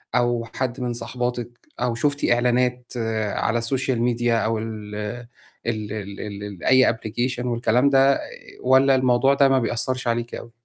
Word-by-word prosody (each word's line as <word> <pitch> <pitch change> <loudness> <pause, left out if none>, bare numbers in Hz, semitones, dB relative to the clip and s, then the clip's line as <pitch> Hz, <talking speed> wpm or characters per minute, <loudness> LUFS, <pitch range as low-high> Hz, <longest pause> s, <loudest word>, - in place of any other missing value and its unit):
أو 120 -1 +1
حد 130 0 -2
من 120 -1 -1
صاحباتِك، 120 0 -3 0.3
أو 120 -1 0
شُفتِ 145 +3 0
إعلانات 125 +1 +1 0.4
على 115 0 0
السوشيال 125 +1 -1
ميديا 120 -1 +1
أو 115 0 0
ال 110 -1 -6 0.7
ال 110 -3 -3
ال 100 -2 -6 0.2
ال 100 -3 -8
أي 130 -2 +5
application 120 +3 -3
والكلام 120 +2 +2
ده 135 0 +4 0.4
والَّا 130 +1 +5
الموضوع 130 +1 +3
ده 140 0 +4
ما 135 -1 +4
بيأثَّرش 120 +2 -1
عليكِ 120 0 -1
أوي؟ 115 - -9
120 Hz, 145 wpm, -23 LUFS, 115-130 Hz, 0.7 s, أي